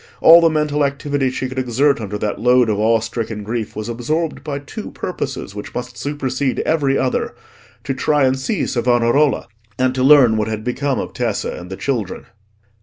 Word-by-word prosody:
All 170 +1 +8
the 165 - +5
mental 150 -1 0
activity 140 -1 -1
she 130 0 -3
could 130 +1 -4
exert 130 +2 +1
under 105 -1 -4
that 105 0 -3
load 125 0 +4
of 105 - -1
awe 110 +1 +3
stricken 110 -1 -4
grief, 110 0 -4
was 110 0 -5
absorbed 150 +8 -2
by 145 -2 -3
two 145 +10 -8
purposes 135 - -5
which 105 0 -8
must 125 0 -5
supersede 135 +1 -2
every 140 -4 +1
other; 130 - -1 0.5
to 135 - -2
try 145 +2 +1
and 130 0 +1
see 185 +7 -1
Savonarola, 120 +4 +2 0.3
and 130 0 +1
to 130 - -2
learn 130 -5 +6
what 105 0 0
had 110 -1 -4
become 130 +3 -1
of - - -4
Tessa - - -2
and 90 +1 -9
the 95 - -6
children. 115 -9 -3
130 Hz, 185 wpm, -19 LUFS, 115-145 Hz, 0.5 s, All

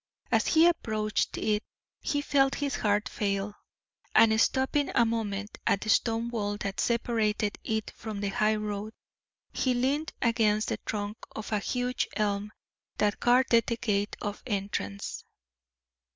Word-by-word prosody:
As - - +3
he 325 +1 +6
approached 215 -11 0
it 210 -1 +1 0.4
he 290 -1 -1
felt 275 -2 +3
his 285 -1 -2
heart 210 0 +1
fail, 200 0 -2 0.6
and 220 0 +6
stopping 265 +4 +2
a 235 - +5
moment 210 -2 -3
at 195 - +3
the 215 - -4
stone 230 0 +2
wall 205 -3 -2
that 195 -1 -3
separated 225 -3 0
it 220 -1 -2
from 215 -2 -6
the 200 0 -1
high 215 +2 +2
road, 210 0 -4 0.6
he 255 -2 +1
leaned 275 +6 0
against 220 -3 +2
the - - -1
trunk 210 0 -3 0.2
of 220 - -6
a 210 - +2
huge 250 +4 -1
elm 205 -1 0 0.5
that 210 0 +1
guarded 245 -1 +4
the 235 - -1
gate 205 -3 0
of 205 0 -4
entrance. 195 - -3
215 Hz, 145 wpm, -29 LUFS, 205-240 Hz, 0.6 s, he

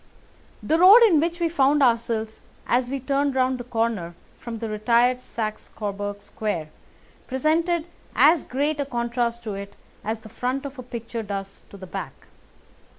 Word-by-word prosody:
The 320 +1 +2
road 400 +7 +9
in 365 -9 +6
which 335 +2 -1
we 340 - +2
found 290 -2 +3
ourselves 230 -2 0 0.2
as 245 0 +1
we 275 +1 -2
turned 275 +1 0
round 255 0 +1
the - - -5
corner 225 -8 -2 0.2
from 235 -1 -6
the 225 0 -4
retired 235 +4 +2
Saxe 215 -3 -5
Coburg 205 -1 -5
Square 175 -8 -4 0.6
presented 320 +5 +1 0.3
as 300 +6 +5
great 290 +3 -1
a 285 - 0
contrast 235 -1 -1
to 215 -3 -4
it 200 0 -7 0.3
as 220 +1 -3
the 220 - -12
front 255 +5 -3
of 280 -1 -7
a - - -3
picture 235 -1 -6
does 195 -2 -6
to 200 - -11
the 190 - -9
back. - - -7
240 Hz, 165 wpm, -24 LUFS, 220-280 Hz, 0.6 s, road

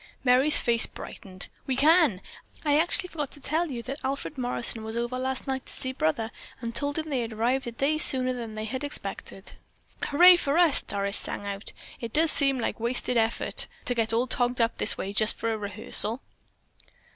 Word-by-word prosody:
Merry's 260 +4 +5
face 235 -1 +2
brightened. 190 -1 -8 0.2
"We 265 - -1
can! 300 - +3 0.4
I 295 0 +3
actually 350 +2 0
forgot 295 -5 -5
to - - -11
tell 315 +5 -1
you 240 -4 -6
that 270 +4 -6
Alfred 275 +3 -4
Morrison 245 -3 -1
was 220 +1 -5
over 240 +2 -3
last 260 0 -3
night 265 -1 -4
to - - -11
see 260 - -4
Brother 225 +1 -2 0.3
and 235 -1 -6
told 285 +3 0
him 315 0 -3
they 270 -5 -2
had 230 -1 -5
arrived 245 +4 -1
a - - -4
day 280 +6 -1
sooner 255 -4 +5
than 230 -3 -7
they 215 0 -5
had 260 +5 -5
expected." 290 - -6 0.5
"Hurray 355 +5 +7
for 290 -2 -1
us!" 345 -5 +6
Doris 200 0 -2
sang 205 - -5
out. 200 0 -4 0.3
"It 230 -2 -7
does 320 +1 +4
seem 275 -2 +3
like 235 - -3
wasted 245 +2 -2
effort 225 0 +2 0.2
to 250 - 0
get 225 -2 0
all 230 +2 +1
togged 245 0 -1
up 230 0 0
this - - +3
way 195 - -5
just 215 +1 0
for 230 0 -2
a - - -3
rehearsal." 210 +3 +2
250 Hz, 200 wpm, -26 LUFS, 225-285 Hz, 0.5 s, Hurray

